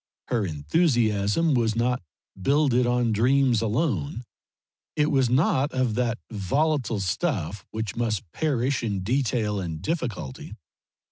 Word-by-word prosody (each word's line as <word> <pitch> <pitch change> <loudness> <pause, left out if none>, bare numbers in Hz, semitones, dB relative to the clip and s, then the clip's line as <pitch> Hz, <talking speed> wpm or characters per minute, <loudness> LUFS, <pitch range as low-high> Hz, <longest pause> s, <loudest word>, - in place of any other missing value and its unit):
Her 115 -6 0
enthusiasm 110 - +1
was 115 -3 +1
not 125 +2 +1 0.4
builded 135 0 +3
on 120 -1 +1
dreams 125 +1 +3
alone; 115 - -1 0.7
it 150 0 +2
was 135 -4 +3
not 135 +1 +2
of 130 -3 +1
that 120 0 0
volatile 120 - 0
stuff 95 - -2
which 110 -2 -4
must 115 -4 -1
perish 135 -3 0
in 100 -4 -2
detail 115 -2 0
and 85 -4 -4
difficulty. 120 - -4
120 Hz, 120 wpm, -25 LUFS, 105-135 Hz, 0.7 s, builded